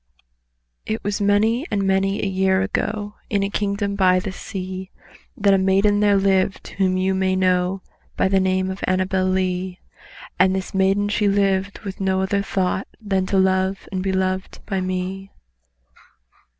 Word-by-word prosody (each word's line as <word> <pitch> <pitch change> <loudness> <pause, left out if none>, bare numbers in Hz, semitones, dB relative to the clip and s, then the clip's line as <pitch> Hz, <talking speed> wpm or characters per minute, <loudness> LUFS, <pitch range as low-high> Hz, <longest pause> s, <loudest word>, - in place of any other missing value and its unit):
It 220 +1 -3
was 205 +1 -2
many 220 - +2
and 200 -2 0
many 195 +1 +1
a - - +1
year 190 0 +2
ago, 205 +1 -2 0.2
In 200 -2 +1
a 200 - -2
kingdom 200 0 -1
by 185 -2 +3
the 190 +1 -4
sea, 185 -1 -6 0.5
That 200 -1 +4
a 195 - +4
maiden 195 +2 +3
lived 195 -2 +2
whom 185 -1 0
you 190 +1 +1
may 190 0 +1
know 185 0 +1 0.3
By - - +3
the 195 0 +3
name 185 0 +1
of 190 - -7
ANNABEL 185 0 +1
LEE;— 185 0 -1 0.6
And 185 +1 +4
this 190 -1 -4
maiden 195 +1 +2
she 205 0 +1
lived 195 -1 +1
with 195 -2 -7
no 190 -1 +1
other 200 +1 0
thought 190 -1 -1
Than 195 -4 -1
to 195 - +1
love 190 0 +1
and 190 -1 -2
be 190 0 -1
loved 185 0 -2
by 195 -3 -2
me. 185 +1 -3
190 Hz, 165 wpm, -22 LUFS, 185-200 Hz, 0.6 s, That